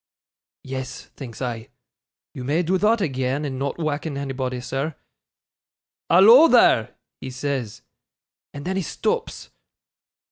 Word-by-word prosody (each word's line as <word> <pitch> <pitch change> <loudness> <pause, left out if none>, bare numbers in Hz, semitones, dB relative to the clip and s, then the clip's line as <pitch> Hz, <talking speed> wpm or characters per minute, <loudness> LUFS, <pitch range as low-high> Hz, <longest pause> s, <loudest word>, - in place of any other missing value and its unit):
"Yes," 130 -1 -7
thinks 130 -2 -8
I, 120 0 -5 0.6
"you 130 -4 -7
may 150 +7 0
do 185 +3 0
thot 215 +2 +2
agean, 135 -1 -2
and 130 -2 -4
not 140 +1 -3
wakken 155 -2 -3
anybody, 130 -2 -3
sir." 135 +5 -4 1.1
"Hallo, 225 - +8
there," 125 - +4 0.2
he 130 - -7
says, 125 -4 -4 0.7
and 145 0 -9
then 190 +1 -2
he - - 0
stops. 165 - -3
140 Hz, 120 wpm, -23 LUFS, 130-165 Hz, 1.1 s, Hallo